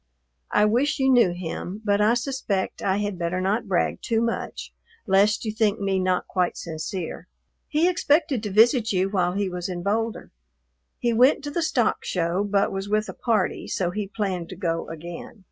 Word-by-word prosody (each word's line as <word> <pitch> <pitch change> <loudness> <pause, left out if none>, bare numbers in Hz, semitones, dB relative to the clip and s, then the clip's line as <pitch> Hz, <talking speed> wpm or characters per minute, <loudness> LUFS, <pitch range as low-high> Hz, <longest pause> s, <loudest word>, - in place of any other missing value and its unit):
I 210 - +3
wish 255 +8 +2
you 265 -1 +3
knew 240 -7 +5
him, 175 +2 -5
but 205 0 +2
I 215 +3 +4
suspect 240 -6 -2
I 190 0 +1
had 205 -3 -3
better 170 +2 -1
not 205 +4 0
brag 185 -3 0
too 225 -1 0
much, 230 0 -3 0.3
lest 205 +3 +3
you 215 - -1
think 215 -1 +1
me 195 -1 0
not 185 -1 0
quite 180 -2 0
sincere. 165 +2 -5 0.4
He 315 +2 +2
expected 300 -7 +2
to 210 - -4
visit 225 +3 +4
you 190 0 +1
while 180 -3 +1
he 200 0 0
was 180 0 -4
in 175 -1 -4
Boulder. 225 +3 -2 0.7
He 240 -1 0
went 255 +5 +4
to 290 - -4
the 340 - -1
Stock 295 -8 +1
Show, 175 +2 0
but 200 -1 +1
was 195 +1 -4
with 215 +1 0
a - - -5
party, 220 -6 -1
so 180 -2 -1
he 205 +1 -3
planned 190 -4 -3
to 185 - -7
go 165 -3 -2
again. 170 +5 -8
205 Hz, 190 wpm, -24 LUFS, 185-230 Hz, 0.7 s, knew